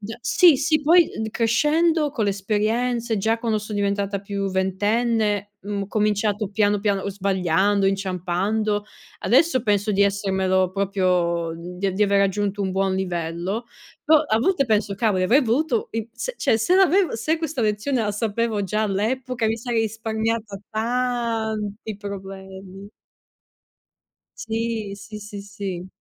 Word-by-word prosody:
Da 215 +2 -7
sì, 275 +7 +5
sì. 310 +3 +1
Poi, 335 +3 +5
mhmm, 220 - -1
crescendo, 300 +8 +2
con 240 - -2
le 200 - +2
esperienze, 225 +4 0
già 220 +3 +1
quando 225 -2 0
so 210 +1 -8
diventata 200 -1 -1
più 200 0 -3
ventenne, 205 +2 0
mhmm, 200 0 -3
ho - - -5
cominciato 210 0 0
piano, 205 0 +2
piano, 200 -1 0
uhm, - - -3
sbagliando, 195 0 +1
inciampando. 195 +3 -1 0.4
Adesso 325 -6 +3
penso 205 -1 +1
di 200 -1 +3
essermelo 190 -2 +1
proprio 180 -4 0
di 180 +3 -4
di 205 - +1
aver 200 0 +2
raggiunto 200 +1 0
un 190 - -1
buon 190 0 0
livello. 180 +3 -3 0.4
Però, 310 -1 +6
a 220 -8 +1
volte 280 +3 +2
penso: 210 -2 +1
"Cavoli, 200 -3 +1
avrei 255 +10 +4
voluto 250 +1 0
i 225 0 -4
se, - - -5
cioè, - - +2
se 345 +12 +3
l'avev 380 0 +4
se 270 +9 0
questa 315 -5 -3
lezione 220 +4 0
la 210 -2 -1
sapevo 220 0 -1
già 210 +3 -1
all'epoca, 230 +4 -1
mi 220 +1 0
sarei 235 0 -1
risparmiata 220 -1 -3
tanti 225 -3 -2
problemi". 195 -1 -9 1.5
Sì, 225 -2 -3
sì, 205 +2 -9
sì, 205 -1 -8
sì. 195 -3 -6
210 Hz, 145 wpm, -23 LUFS, 195-230 Hz, 1.5 s, Però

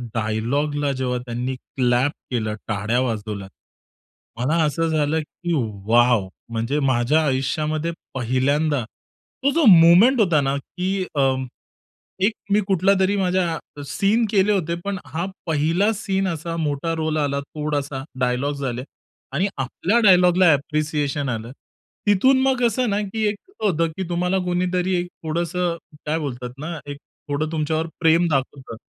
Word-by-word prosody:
डायलॉगला 140 +7 0
जेव्हा 130 -1 -1
त्यांनी 125 +2 -3
क्लॅप 125 +1 0 0.2
केलं, 110 -3 -1
टाळ्या 110 -1 -2 0.9
मला 135 +7 +1
असं 165 +2 0
झालं 155 0 +1
की 170 +3 -5 0.3
वाव! 120 -3 +4 0.2
म्हणजे 115 +5 -1
माझ्या 135 +3 +2
आयुष्यामध्ये 150 +4 -1 0.2
पहिल्यांदा 130 +3 +1 0.6
तो 280 - +4
जो 330 +2 +2
मोमेंट 180 +8 +7
होता 170 -7 +3
ना, 135 0 0
की 185 +6 -3
अ, 140 - +2 1.0
एक 215 - +3 0.2
मी 205 - +5
कुठलातरी 190 +1 +3
माझ्या 180 -3 +1 0.3
सीन 215 +8 +2
केले 200 0 +3
होते. 170 -4 0
पण 200 -1 -2
हा 160 +6 -3 0.2
1ला 165 +7 +2
सीन 195 -1 -1
असा 165 0 -4
मोठा 155 +1 -1
रोल 155 -1 -1
आला 140 -2 0
थोडासा, 145 -2 -3 0.2
डायलॉग्स 130 +3 -1
आले 125 -1 -3 0.5
आणि 180 +8 +1
आपल्या 165 - 0
डायलॉगला 180 -3 +6
अप्रिसिएशन 145 -1 -1
आलं. 115 0 -4 0.6
तिथून 260 +7 +4
मग 265 -1 +2
कसं 245 0 +2
ना, 200 - +1
की 215 +2 -2
एक 205 - -3 0.3
होतं, 165 -5 +2
की 190 - -2
तुम्हाला 180 +2 0
कोणीतरी 180 +1 0
एक 175 - -3 0.2
थोडंसं 170 +2 -1 0.3
काय 155 +2 0
बोलतात 125 -5 -5
ना, 165 +3 -5
एक 145 - -6 0.3
थोडं 155 +2 -1
तुमच्यावर 160 +1 -1
प्रेम 165 +1 +4
दाखवतं 135 -4 -2
155 Hz, 135 wpm, -22 LUFS, 130-180 Hz, 1.0 s, मोमेंट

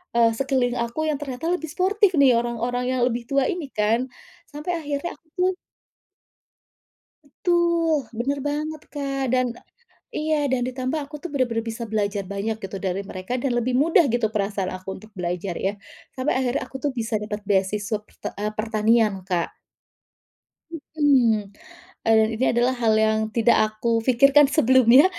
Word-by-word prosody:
eee, 230 -1 +5
sekeliling 255 -2 0
aku 235 +7 -2
yang 300 - 0
ternyata 275 +2 -4
lebih 320 -3 -3
sportif 385 +3 +2
nih, 270 -3 +6
orang-orang 240 +1 -2
yang - - 0
lebih 240 -1 -2
tua 275 -1 +2
ini 350 -5 -4
kan, 225 +4 +1 0.4
sampai 300 +4 -4
akhirnya 290 +4 -3
aku 320 - -40
tuh 365 +1 +2 1.7
Betul, 335 -3 +1
bener 275 +4 -1
banget, 300 +2 -3
Kak. 275 -2 -2
Dan 255 -2 +1 0.6
e - - -3
iya, 300 -2 +2
dan 260 -2 0
ditambah 255 +4 -2
aku 290 +1 -8
tuh 350 +4 -7
benar-benar 240 -4 0
bisa 225 +1 -4
belajar 205 -1 -1
banyak 210 +3 -2
gitu 195 0 -5
dari 190 0 -2
mereka 185 +2 -6
dan 245 -3 0
lebih 245 +1 0
mudah 320 +6 +4
gitu 240 -3 +1
perasaan 200 -3 -2
aku 185 0 -8
untuk 215 +1 -15
belajar, 180 0 -3
ya. 195 - -1 0.4
Sampai 260 +3 -1
akhirnya 260 +1 0
aku 265 - -6
tuh 290 - +1
bisa 225 -2 -1
dapat 210 0 -5
beasiswa 205 +1 0
perte - - -8
eee, 210 +1 -2
pertanian, 220 0 +2
Kak. 180 -3 -1 1.4
Mhm. 240 -9 +3 0.5
E - - +1
dan 220 0 +4
ini 250 +4 0
adalah 240 +2 +2
hal 220 -1 +4
yang 220 0 +2 0.2
tidak 235 0 +4
aku 225 +2 -1
pikirkan 275 +3 +6
sebelumnya, 260 -1 +6
245 Hz, 160 wpm, -23 LUFS, 215-285 Hz, 1.7 s, nih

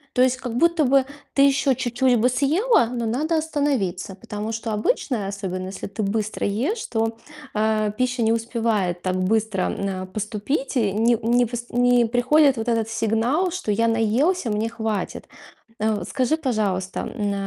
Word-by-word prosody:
То 250 - +3
есть 255 0 +3
как 245 -3 -5
будто 335 +1 +3
бы 265 0 +4 0.3
ты 275 - +3
ещё 275 -1 +4
чуть-чуть 245 0 +1
бы 250 +3 +3
съела, 295 - +3
но 235 -1 -3
надо 305 +8 0
остановиться, 275 - -1
потому 215 -1 -5
что 225 0 -4
обычно, 215 - -1
особенно 190 -2 -4
если 195 - -6
ты 200 +2 -4
быстро 215 +1 -2
ешь, 265 - -1
то, 225 0 -1 0.4
э, 215 0 +1
пища 255 -1 0
не 225 0 +3
успевает 225 -6 -1
так 185 0 -1
быстро, 205 +1 0
э, 190 -1 -3
поступить. 215 +8 -3
И 210 -5 +2
не 230 +2 +3
не 240 +1 +3
вс 240 +1 -5
не 245 0 +3
приходит 255 +3 +3
вот 225 +2 -3
этот 225 -1 0
сигнал, 230 - +1
что: 360 -12 -3
"Я 230 +3 +2
наелся, 230 - +1
мне 215 +2 -1
хватит". 220 -3 -3 0.5
Э, 215 -3 0
скажи, 280 +4 0
пожалуйста, 205 -9 -1
м, 205 -4 -2
230 Hz, 165 wpm, -23 LUFS, 210-255 Hz, 0.5 s, бы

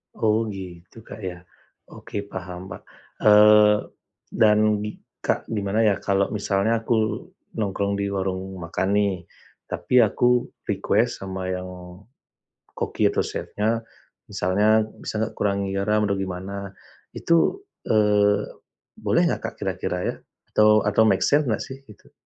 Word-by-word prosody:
Oh 110 +1 +1
gitu 95 +1 -9
Kak, - - -10
ya, 90 -1 -6 0.5
oke 100 - -6
paham 90 0 -7
ba - - -7 0.4
eee, 105 0 +6 0.5
dan 105 -1 +3
di 105 - -5 0.2
Kak, - - -1
gimana 105 0 0
ya 105 -2 +4
kalau 100 0 0
misalnya 105 +2 0
aku 115 - +1 0.6
nongkrong 100 -1 -1
di 100 - -1
warung 95 0 -3
makan 85 +3 -2
nih, 100 -1 +2 0.5
tapi 125 - +1
aku 120 +2 +3 0.2
request 105 +4 0
sama 95 -1 -4
yang, 90 0 -4 1.1
koki - - 0
atau - - 0
chefnya, 110 +2 -2 0.5
misalnya 105 +4 +2 0.2
bisa - - -5
enggak 110 - -3
kurangin 100 -1 0
garam 105 +2 +1
atau 100 - 0
gimana 95 +1 -5 0.4
itu, 170 - +2 0.2
eee, 105 -1 +3 0.6
boleh - - +2
enggak - - -1
Kak, - - -23
kira-kira - - -2
ya? - - -3 0.4
Atau 105 0 +5
atau 105 +2 +3
make 95 -3 +2
sense 145 0 +3
enggak 110 -3 -1
sih 135 0 -9
itu? 105 - -17
105 Hz, 135 wpm, -24 LUFS, 95-110 Hz, 1.1 s, eee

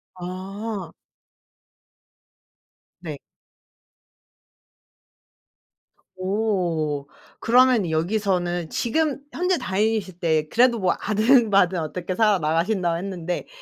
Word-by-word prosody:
아. 190 +1 -6 2.1
네. 155 -5 -6 3.0
오. 180 -7 -1 0.3
그러면 245 -5 +4
여기서는 175 0 -1
지금 295 +4 0
현재 360 +1 +1
다니실 195 - -1
때 160 -3 +1
그래도 240 0 +3
뭐 185 -2 +2
아등바등 210 -5 +3
어떻게 180 +3 -4
살아 210 -2 +3
나가신다고 170 +2 0
했는데 180 -1 -4
190 Hz, 170 characters per minute, -23 LUFS, 175-220 Hz, 3.0 s, 그러면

